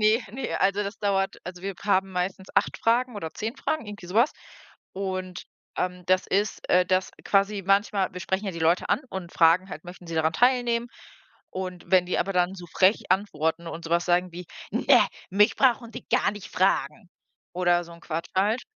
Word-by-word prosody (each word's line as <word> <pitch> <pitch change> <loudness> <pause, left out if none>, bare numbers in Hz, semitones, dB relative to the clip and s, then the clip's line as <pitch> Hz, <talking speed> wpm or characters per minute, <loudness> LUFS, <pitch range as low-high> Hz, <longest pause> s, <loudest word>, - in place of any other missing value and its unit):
ne, 215 +3 +4
ne, 270 - -4
also, 195 +2 +2
das 200 +2 -6
dauert 195 -1 0
also, 180 0 -8
wir 195 -1 -3
haben 195 -1 +2
meistens 185 +1 -3
8 - - +1
Fragen 240 +1 +1
oder 160 -6 -5
10 225 +5 -4
Fragen, 310 -4 -2
irgendwie 205 -3 -9
sowas. 225 - +3 0.6
Und, 185 -2 -4 0.3
ähm, 180 0 -2
das 185 0 +2
ist, 205 +2 0
äh, 180 0 +4
dass 185 +1 +1
quasi 200 0 +2
manchmal 195 0 +2
wir 180 - -7
sprechen 190 +2 -2
ja - - -1
die 170 - -7
Leute 165 +3 +2
an - - +2
und 185 -3 -7
fragen 170 +3 +4
halt: 155 - -8
„Möchten 175 0 -11
Sie 165 - -6
daran 160 0 +2
teilnehmen?“ 240 +2 +2 0.6
Und 185 -1 -6
wenn 185 -1 +5
die 180 - -1
aber 195 - 0
dann 180 0 +1
so 180 -2 -10
frech 190 +3 +3
antworten 170 -4 0
und 165 0 -7
sowas 170 +1 +1
sagen 180 0 +1
wie: 175 +1 -8 0.3
„Ne, - - +5 0.3
mich 205 +4 +4
brauchen 240 -3 +2
Sie - - -8
gar - - +3
nicht 205 -2 -9
fragen.“ 180 -3 0 0.5
oder 175 -1 +2
so 170 - -13
'n 170 - -14
Quatsch 165 0 -4
halt 210 +6 +2
190 Hz, 195 wpm, -26 LUFS, 175-205 Hz, 0.6 s, wenn